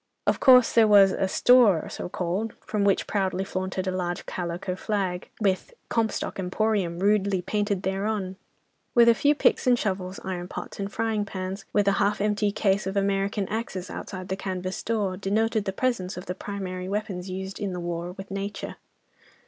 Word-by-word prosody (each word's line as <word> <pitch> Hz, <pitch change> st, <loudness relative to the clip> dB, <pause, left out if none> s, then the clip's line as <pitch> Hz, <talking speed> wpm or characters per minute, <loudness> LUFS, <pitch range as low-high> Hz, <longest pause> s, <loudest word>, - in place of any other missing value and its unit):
Of -, -, +2 dB
course 255 Hz, -3 st, +7 dB
there 225 Hz, -2 st, +6 dB
was 200 Hz, -2 st, +7 dB
a 190 Hz, -, 0 dB
"store," 220 Hz, -4 st, +5 dB
so -, -, -6 dB
called, 185 Hz, +6 st, -2 dB
from 210 Hz, -2 st, -1 dB
which 200 Hz, -1 st, +2 dB
proudly 190 Hz, -2 st, 0 dB
flaunted 185 Hz, 0 st, -3 dB
a 185 Hz, -, 0 dB
large 175 Hz, -1 st, -3 dB
calico 180 Hz, +1 st, -3 dB
flag, 190 Hz, -3 st, -2 dB
with 195 Hz, -, 0 dB, 0.2 s
"Comstock 225 Hz, -3 st, -1 dB
Emporium" 190 Hz, -2 st, 0 dB
rudely 200 Hz, -1 st, +2 dB
painted 205 Hz, -2 st, -1 dB
thereon, 195 Hz, 0 st, -1 dB, 0.6 s
while 235 Hz, -1 st, +7 dB
a -, -, +7 dB
few 290 Hz, +6 st, +3 dB
picks 285 Hz, -, +2 dB
and 245 Hz, -1 st, +5 dB
shovels, 190 Hz, -3 st, -2 dB
iron 180 Hz, -2 st, -4 dB
pots -, -, -7 dB
and 200 Hz, 0 st, -3 dB
frying 220 Hz, -2 st, 0 dB
pans, 190 Hz, 0 st, -5 dB
with 205 Hz, -1 st, +2 dB
a -, -, +6 dB
half 205 Hz, +1 st, +2 dB
emptied 210 Hz, 0 st, +1 dB
case 195 Hz, -1 st, +1 dB
of 195 Hz, +1 st, -2 dB
American 195 Hz, 0 st, 0 dB
axes 195 Hz, -5 st, -4 dB
outside 185 Hz, -1 st, -7 dB
the 190 Hz, -, 0 dB
canvas 185 Hz, -1 st, -4 dB
door, 205 Hz, -5 st, -1 dB
denoted 215 Hz, +2 st, 0 dB
the 195 Hz, -, -1 dB
presence 195 Hz, -4 st, -1 dB
of 180 Hz, -, -6 dB
the 180 Hz, -, -3 dB
primary 185 Hz, -1 st, -5 dB
weapons 195 Hz, -3 st, -3 dB
used 190 Hz, +1 st, -5 dB
in 200 Hz, -2 st, -2 dB
the 180 Hz, -, -4 dB
war 175 Hz, 0 st, -4 dB
with 195 Hz, +1 st, -10 dB
nature. 195 Hz, +1 st, -5 dB
195 Hz, 180 wpm, -26 LUFS, 185-210 Hz, 0.6 s, course